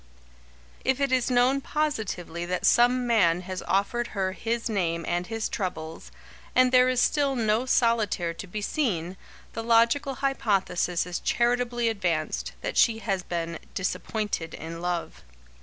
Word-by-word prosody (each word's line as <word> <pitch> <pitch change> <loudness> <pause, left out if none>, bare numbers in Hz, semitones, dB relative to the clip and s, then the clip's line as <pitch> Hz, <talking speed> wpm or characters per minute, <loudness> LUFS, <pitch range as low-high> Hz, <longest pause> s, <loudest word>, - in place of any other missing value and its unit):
If 265 0 +1
it 275 -1 +1
is 255 -1 +2
known 255 +2 +3
positively 220 - -2
that 180 0 -2
some 245 +1 +4
man 185 -8 +3
has 185 0 -5
offered 235 +5 0
her 190 -1 0
his 230 +4 -2
name 170 -6 -1
and 175 +1 -1
his 225 -1 -2
troubles, 165 -5 -5 0.4
and 255 0 +5
there 255 0 +5
is 255 -1 +1
still 280 -1 +2
no 225 +1 +1
solitaire 220 -9 +1
to 195 - -8
be 210 +3 -5
seen, 190 - -1 0.4
the 225 - -3
logical 235 +4 +3
hypothesis 195 -10 0
is 180 -1 -4
charitably 240 0 +1
advanced, 175 -8 -1
that - - -4
she 230 -2 +4
has 195 -4 -2
been 170 -2 -4 0.2
"disappointed 195 -2 -3
in 165 +1 -7
love." 175 -1 -3
220 Hz, 145 wpm, -26 LUFS, 180-245 Hz, 0.4 s, and